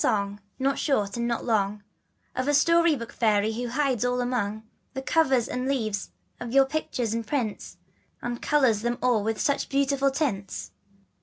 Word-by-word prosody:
song, 200 -1 0 0.2
not 270 +1 0
short 210 -9 0
and 235 0 -1
not 235 -1 -2
long, 210 -3 0 0.5
Of 255 +1 -1
a - - +3
stQjpy^rtflc 315 -4 +3
fairy^ho 220 +2 +2
hides 260 -2 0
all 250 0 +1
among 220 -4 -1 0.3
The 265 - -4
covers 265 -6 +2
and 250 +1 -3
leaves 220 -7 -1 0.3
of 240 -1 -5
your 270 +1 +6
pictures 255 -6 -2
and 230 -1 -3
prints, 230 -6 -3 0.5
^And 240 0 -3
colors 260 -8 +3
them 240 +1 -1
all 240 -4 +3
with 220 +1 -1
such 280 -2 0
beautiful 275 0 +2
tints? 250 -9 -3
245 Hz, 160 wpm, -26 LUFS, 220-275 Hz, 0.5 s, your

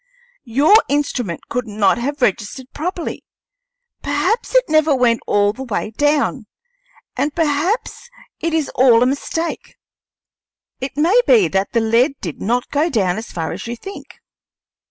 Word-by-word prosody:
Your 280 - +4 0.2
instrument 250 - -2
could 245 -1 -3
not 205 0 +1
have 285 +2 -3
registered 235 +5 -2
properly; 345 +2 -4 0.8
perhaps 300 - -1
it - - +6
never 310 -2 +3
went 240 -3 +2
all 205 0 +2
the 260 - -10
way 225 -4 -3
down; 285 -2 0 0.7
and 295 0 -1
perhaps 330 +10 -1 0.3
it 335 - -1
is 315 -3 0
all 245 -2 +5
a - - +3
mistake. 305 +5 -3 1.0
It 265 +1 -6
may 355 +11 +4
be 455 -5 +5
that 195 +1 -1
the 230 - +2
lead 235 +5 +2
did 170 -6 -6
not 240 +4 -1
go 300 +4 +1
down 200 - 0
so 230 - -11
far 165 -2 -3
as 185 +6 -6
you 235 - -4
think." 390 +11 -10
265 Hz, 150 wpm, -19 LUFS, 230-310 Hz, 1.0 s, it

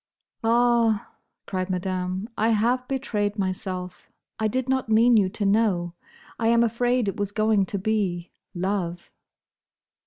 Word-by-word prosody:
"Ah!" 230 -2 +2 0.3
cried 185 -1 -3
Madame, 185 +1 -2
"I 220 +2 +1
have 240 +3 +1
betrayed 215 -6 -2
myself. 185 -1 -4 0.3
I 220 - +1
did 255 +4 -2
not 260 -3 0
mean 230 +2 +5
you 200 -4 +4
to 205 +2 -3
know. 195 -5 +1 0.5
I 225 - +1
am 235 0 +4
afraid 240 0 +1
it 195 - -2
was 205 -1 -2
going 215 -2 +2
to 200 - -3
be—love." 185 -2 -3
210 Hz, 130 wpm, -25 LUFS, 185-230 Hz, 0.5 s, mean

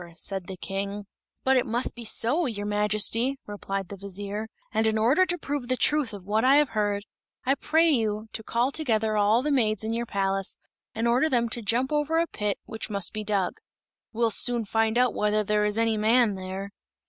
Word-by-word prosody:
said 190 +1 -3
the 190 - -6
King. 200 +2 -4 0.4
"But 265 0 +4
it 255 - +2
must 235 +2 -1
be 240 - -8
so, 255 +9 +1
your 205 -4 -3
Majesty," 210 +5 +1
replied 195 -2 -4
the 200 - -6
vizier; 200 +2 -5 0.3
"and 220 0 +2
in 220 0 +1
order 265 +12 +4
to 350 - -1
prove 285 -5 -4
the 255 0 0
truth 295 -3 +2
of 200 -3 -9
what 215 +3 +1
I 265 +2 +6
have 295 -2 +4
heard, 205 -1 -1 0.4
I 265 - +4
pray 315 +4 +2
you 215 -5 0
to - - -4
call 235 +4 0
together 220 -8 +1
all 210 +4 +3
the 300 - 0
maids 215 -6 +1
in 220 +1 -2
your 235 +1 -2
palace 195 -1 -1 0.4
and 225 +2 0
order 250 +7 +3
them 235 -4 +1
to 235 - -3
jump 235 +6 0
over 300 +2 +1
a 335 - +3
pit, 210 -10 -3
which 220 0 -5
must 200 -3 -2
be 215 -1 -3
dug. 200 -3 -1 0.5
We'll 230 0 +1
soon 240 +1 +2
find 225 +2 +1
out 250 -1 +3
whether 210 0 +1
there 210 +1 +1
is 210 +1 +1
any 225 -1 +2
man 225 +1 +3
there." 190 +1 -6
220 Hz, 205 wpm, -26 LUFS, 205-250 Hz, 0.5 s, I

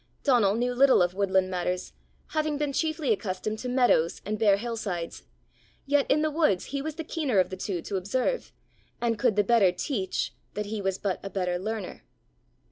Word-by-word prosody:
Donal 230 -8 +4
knew 245 +2 0
little 260 -6 +5
of 175 0 0
woodland 190 -1 +1
matters, 180 0 -2 0.4
having 310 -1 0
been 290 -1 -1
chiefly 315 -5 +1
accustomed 215 +2 -3
to 250 - -4
meadows 245 -10 +3
and 210 +1 -2
bare 205 -3 +5
hill 235 +2 -4
sides; 175 - -4 0.6
yet 285 0 +2
in 305 - +3
the 310 - +1
woods 300 - +2
he 280 - -1
was 310 +1 -4
the 325 - -4
keener 295 - -1
of 185 0 +3
the - - -3
two 185 -2 -3
to 200 - -3
observe, 255 - -1 0.5
and 230 -3 0
could 240 -4 +2
the 205 - +4
better 205 -3 +4
teach 195 - -2 0.2
that 210 - -2
he 210 0 -4
was 190 -1 -1
but 195 -3 -2
a 195 - -6
better 180 -2 -1
learner. 215 0 -5
215 Hz, 195 wpm, -27 LUFS, 190-265 Hz, 0.6 s, little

